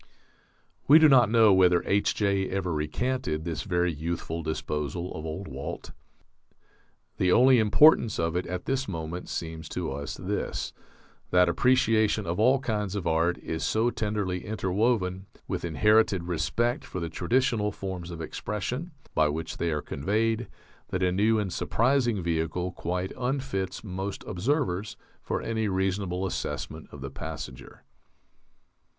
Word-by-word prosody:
We 150 - +9
do 160 -1 +7
not 125 -6 +6
know 110 -3 +6
whether 90 -2 +4
H.J. 100 -1 +1
ever 95 -3 -1
recanted 80 +3 -2
this 80 -3 -3
very 90 -3 0
youthful 80 +1 -4
disposal 80 +2 -3
of 80 +1 -6
old 85 +5 -5
Walt. 70 +1 -6 1.3
The 90 - +2
only 125 +4 +6
importance 115 +2 +5
of 80 0 -1
it 90 - -1
at 90 0 -4
this 135 0 -1
moment 85 0 -5
seems 80 -1 -5
to - - -3
us 70 +1 -5
this: - - -3 0.6
that 90 0 +5
appreciation 110 +1 +3
of 85 +3 -2
all 125 +5 +5
kinds 105 -6 -2
of 100 - -3
art 85 +1 +2
is 80 - -3
so 115 +2 +2
tenderly 105 -5 -2
interwoven 95 -2 0 0.2
with - - -3
inherited 100 +2 +3
respect 90 +9 -1
for 95 - -6
the 85 - -3
traditional 105 +5 +1
forms 95 -3 -6
of 85 -2 -7
expression 125 - -4 0.2
by 80 -1 +3
which 80 +2 -4
they 85 - 0
are 75 -2 -2
conveyed 110 - 0 0.4
that 90 0 -2
a 90 - +3
new 105 +4 +3
and 100 -4 -2
surprising 120 -4 +1
vehicle 85 +2 -1
quite 90 +1 -3
unfits 125 -7 -2
most 95 0 -5
observers 105 - -1 0.2
for - - -3
any 110 -1 -1
reasonable 95 -1 -1
assessment 95 - -4
of 70 - -10
the 70 -1 -6
passenger. 65 - -8
95 Hz, 145 wpm, -27 LUFS, 85-110 Hz, 1.3 s, We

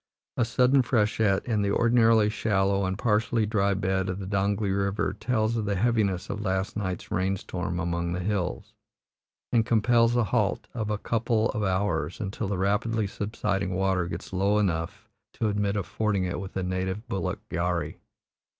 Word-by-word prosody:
A 120 - +2
sudden 125 +3 +4
freshet 105 -4 +1
in 110 -4 0
the 100 - +1
ordinarily 115 0 +4
shallow 100 -3 +1
and 95 0 -2
partially 110 +1 +1
dry 100 -2 +1
bed 95 0 0
of 90 - -2
the 100 - -6
Donglee 100 +1 0
River 100 0 0
tells 110 +1 0
of 110 -2 -1
the 100 -1 0
heaviness 100 -3 +1
of 105 - -4
last 95 -1 -1
night's 95 -3 -4
rainstorm 95 -2 -2
among 85 0 -1
the 90 - -2
hills, 90 - -2 0.8
and 115 -2 +4
compels 115 +1 +3
a 120 - +3
halt 110 -2 0
of 110 -3 -3
a 105 - 0
couple 115 0 0
of 105 - -3
hours 95 -3 -1
until 100 0 -3
the 100 -1 -2
rapidly 105 +3 +1
subsiding 100 -2 -2
water 95 -2 +1
gets 85 +3 -7
low 100 +3 +2
enough 100 +2 -1 0.3
to 110 - -1
admit 100 0 0
of 100 -3 -1
fording 105 -4 0
it 90 - -3
with 95 0 -6
a 95 - -1
native 95 +5 -3
bullock 95 -2 -2
gharri. 85 +1 -1
100 Hz, 170 wpm, -27 LUFS, 95-110 Hz, 0.8 s, sudden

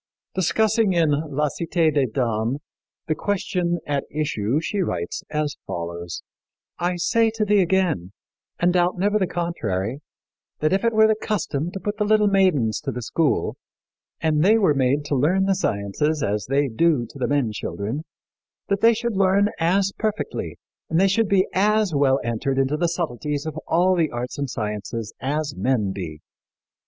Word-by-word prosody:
Discussing 215 +3 +2
in 165 -3 +3
La 150 0 0
Cité 165 0 0
des 140 -3 +2
Dames 115 +1 -1 0.5
the 160 - 0
question 180 -1 -1
at 140 -2 -1
issue 140 -4 -1
she 200 +5 -3
writes 85 - -2
as 150 -1 -2
follows: 85 0 -5 0.6
"I 175 +1 0
say 225 +6 +2
to 215 -1 0
thee 205 -1 +4
again, 175 - +1 0.5
and 175 +1 +3
doubt 180 0 +2
never 205 +3 +2
the 190 - +1
contrary, 120 - -2 0.6
that 155 +3 +1
if 195 - +1
it 230 0 +2
were 220 0 +6
the 220 - +4
custom 175 -8 -2
to 195 - -4
put 205 +2 -3
the 210 - +1
little 215 0 +3
maidens 155 - +2
to - - -3
the 125 +1 -5
school, 160 +6 0 0.6
and 155 -2 +1
they 215 +4 +5
were 190 -9 +3
made 140 +2 +1
to 145 - -1
learn 175 +9 +2
the 195 - +3
sciences 150 - -1
as 105 0 -1
they 140 +1 +2
do 135 +1 +2
to 140 - -13
the 125 - 0
men 140 -6 +1
children, 105 +5 -4 0.7
that 200 0 +1
they 230 0 +6
should 235 -1 -2
learn 195 +1 +3
as 190 +4 +2
perfectly, 215 -1 -3 0.3
and 160 - +2
they 195 - +5
should 215 +3 +2
be 195 -1 +4
as 210 -1 +2
well 140 -1 +3
entered 120 +4 -1
into 135 +2 +2
the 170 +3 +1
subtleties 150 -3 -3
of 155 - -4
all 180 +3 +3
the 165 -3 +2
arts 125 +4 -5
and 140 -2 -2
sciences 105 0 -4
as 145 +2 -1
men 115 -7 0
be. 80 -6 -6
155 Hz, 175 wpm, -23 LUFS, 130-190 Hz, 0.7 s, were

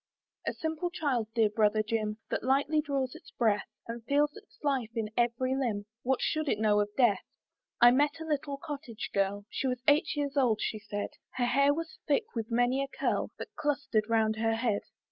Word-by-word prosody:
A - - +1
simple 320 +2 -2
child, 280 -10 -1
dear 220 -3 +4
brother 215 0 +3
Jim, 215 -1 -1
That - - 0
lightly 280 +4 +2
draws 275 -4 -1
its 325 - -13
breath, 215 -4 +1 0.2
And 230 0 -6
feels 290 +2 +2
its - - -15
life 270 -6 +1
in 220 -2 -2
every 245 +2 +1
limb, 225 -7 -1 0.2
What 260 0 +1
should 310 -1 0
it - - +2
know 210 -1 +3
of 205 0 +1
death? 240 -6 +4 0.6
I 240 0 +9
met 290 +5 +2
a 320 - -5
little 285 -2 -2
cottage 275 -6 -6
girl, 200 +1 0
She 270 - -1
was 250 -1 -2
eight 295 +2 +4
years 285 -1 -2
old, 245 -6 +4
she 215 - -2
said; 205 -1 -4 0.3
Her 245 - +1
hair 280 +4 +4
was 330 +2 -4
thick 310 +9 +2
with 225 -2 -3
many 245 +3 +2
a - - -3
curl 265 - -1
That 440 - -8
cluster'd 285 -8 0
round 220 -1 +2
her 225 0 +1
head. 225 -3 0
250 Hz, 200 wpm, -30 LUFS, 220-285 Hz, 0.6 s, I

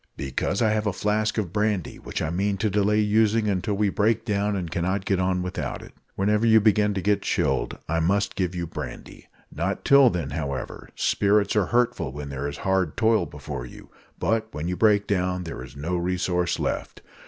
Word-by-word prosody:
"Because 80 - -1
I 110 - +3
have 105 0 0
a 100 - 0
flask 105 +2 0
of 95 -6 -2
brandy, 105 -4 -1
which - - -4
I 80 - -2
mean 100 +3 0
to 105 +2 0
delay 105 +1 +2
using 110 +1 +2
until 100 +1 0
we 105 0 +2
break 110 +3 +1
down 105 -1 0
and 90 -4 -4
cannot 95 +3 -1
get 95 -2 +1
on 90 0 0
without 90 0 -4
it. - - -13 0.2
Whenever 105 +3 +1
you 110 -1 +6
begin 105 -1 +3
to 95 - -2
get 105 0 +2
chilled - - 0
I 80 +1 0
must 100 +5 +1
give 90 -2 -1
you 85 -1 -2
brandy. 80 - -8 0.3
Not 85 +6 -2
till 140 -2 +7
then, 85 -8 -3
however; 70 -2 -5
spirits 100 0 +2
are 105 -3 +2
hurtful 120 - +1
when 70 +1 -7
there 70 +1 -3
is 70 - -5
hard 95 -4 +1
toil 110 -5 +3
before 65 -4 -7
you, - - -14 0.3
but 110 0 0
when 75 +2 -4
you 90 - -1
break 105 0 +3
down 90 -2 0
there 80 -7 -6
is 65 +1 -12
no 80 +5 -2
resource 90 0 0
left. - - -3
95 Hz, 200 wpm, -25 LUFS, 85-105 Hz, 0.3 s, till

